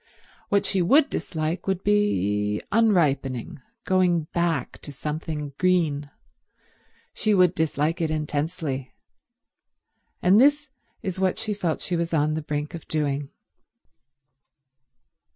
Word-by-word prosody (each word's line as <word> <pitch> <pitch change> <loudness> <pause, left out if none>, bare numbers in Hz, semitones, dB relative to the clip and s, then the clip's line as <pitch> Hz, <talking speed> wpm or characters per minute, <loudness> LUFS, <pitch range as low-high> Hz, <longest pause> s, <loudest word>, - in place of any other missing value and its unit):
What 200 0 +2
she 195 -1 +2
would 275 - +4
dislike 160 +3 -3
would 190 -1 -1
be 105 - +1
unripening, 145 - +1 0.2
going 180 -3 +2
back 170 -1 -1
to 145 - -8
something 150 0 -4
green. 160 -6 +1 1.0
She 215 -1 +1
would 180 -2 +4
dislike 160 0 0
it 160 - 0
intensely; 150 -3 -3 1.2
and 195 +5 +5
this 290 +1 +3 0.3
is 190 -1 -3
what 190 -1 +1
she 215 - -1
felt 175 -6 -2
she 180 - -1
was 170 0 -1
on 150 0 +2
the 160 - -2
brink 150 -1 -4
of 170 - -8
doing. 145 -2 -1
165 Hz, 115 wpm, -25 LUFS, 150-185 Hz, 1.2 s, and